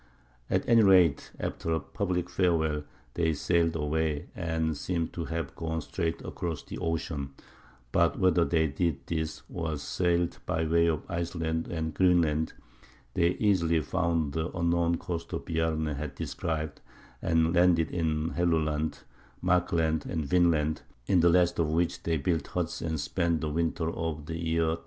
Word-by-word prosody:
At - - 0
any 115 -1 +6
rate, 90 -8 +5
after 80 - -3
a 80 - +1
public 90 +4 -2
farewell 80 -5 +1 0.3
they 80 -2 +1
sailed 85 +2 +1
away, 75 -1 -1
and 80 -1 -1
seem 85 +2 -2
to 85 - -5
have 80 -4 -4
gone 80 0 -2
straight 85 +1 -3
across 80 -4 -4
the - - -7
ocean; 75 -4 -3 0.6
but - - +3
whether 90 -2 +4
they 80 -1 +2
did 75 -1 -1
this, 80 -1 -3
or 80 -3 -2
sailed 85 +4 0
by 80 -2 0
way 85 +1 +3
of 80 -3 0
Iceland 80 -1 -2
and 80 -2 -3
Greenland, 85 -4 +3 0.6
they 85 0 +3
easily 85 -6 +2
found 80 -1 0
the 80 +2 -1
unknown 85 0 +2
coasts 85 -1 -5
Bjarne 80 -1 0
had 75 -2 -4
described, 80 -1 -3 0.4
and 80 0 +2
landed 85 -3 +4
in 80 -1 0
Helluland, 80 -3 0 0.4
Markland, 85 -4 +1
and 80 -4 -2
Vinland, 80 -1 +2 0.2
in 90 - +3
the 85 +1 +5
last 90 0 +3
of 80 -2 +2
which 85 +2 0
they 80 -1 0
built 80 +1 -1
huts 90 -1 -3
and 80 -2 -2
spent 85 +2 0
the 75 -1 -2
winter 80 0 0
of 80 -3 -4
the 80 +1 -5
year 80 0 +1
1000. 80 - -1
80 Hz, 155 wpm, -29 LUFS, 80-85 Hz, 0.6 s, any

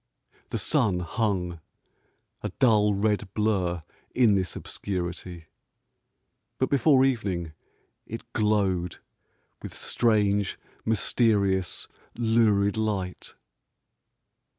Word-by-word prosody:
The - - -2
sun 90 -3 +2
hung, 90 -2 -1 0.8
a - - -3
dull 105 -4 +4
red 105 -1 0
blur 95 -6 0 0.3
in 120 -5 +5
this 95 -2 0
obscurity; 90 -2 -5 1.1
but 130 - 0
before 135 0 +5
evening 95 -11 -1 0.6
it 115 +1 -8
glowed 100 -6 +1 0.6
with - - -8
strange, 105 -4 +1 0.3
mysterious, 100 -4 +1 0.3
lurid 110 -3 +2
light. 100 -4 -3
100 Hz, 80 wpm, -26 LUFS, 90-110 Hz, 1.1 s, in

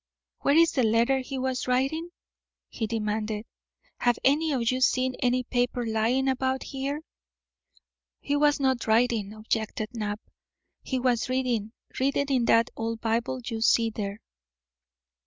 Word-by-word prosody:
"Where 280 - +2
is 335 0 +6
the 270 - +1
letter 235 +4 +3
he 265 +1 -5
was 260 -1 -2
writing?" 270 +7 0 0.6
he 225 - -3
demanded. 215 -1 -2 0.5
"Have 245 -1 +2
any 300 +4 +3
of 240 -4 +1
you 255 0 -2
seen 255 0 +2
any 250 0 +1
paper 245 0 -1
lying 225 +4 +1
about 265 0 0
here?" 280 +2 -4 1.2
"He 285 - -1
was 290 0 +3
not 260 -4 0
writing," 220 -2 +2
objected 215 0 -3
Knapp; 210 -2 -3 0.6
"he 260 - -2
was 245 -1 +1
reading; 245 -4 -1 0.3
reading 280 +1 +1
in 255 -3 +2
that 230 0 +4
old 225 0 -3
Bible 235 +3 -1
you 225 -2 -4
see 230 0 +3
there." 205 -1 -4
245 Hz, 140 wpm, -27 LUFS, 225-265 Hz, 1.2 s, is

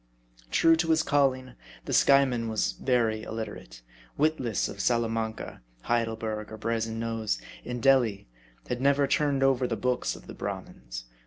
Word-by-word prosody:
True 165 - +5
to 165 0 0
his 160 -1 +4
calling, 130 -3 +1 0.3
the - - -3
Skyeman 130 -4 +4
was 105 - 0
very 110 - 0
illiterate; 110 - -7 0.3
wit 155 +2 +2
less 115 -5 -1
of 100 - -9
Salamanca, 115 -1 -1 0.2
Heidelberg, 110 - -2
or 110 - -7
Brazen 115 0 -2
Nose; 115 - -2 0.2
in 125 -1 -5
Delhi, 120 - +3 0.4
had 125 0 -3
never 140 +1 +4
turned 140 -1 +1
over 130 -2 +3
the 115 -2 -2
books 125 +4 -1
of - - -13
the - - -9
Brahmins. - - -6
115 Hz, 150 wpm, -28 LUFS, 110-135 Hz, 0.4 s, True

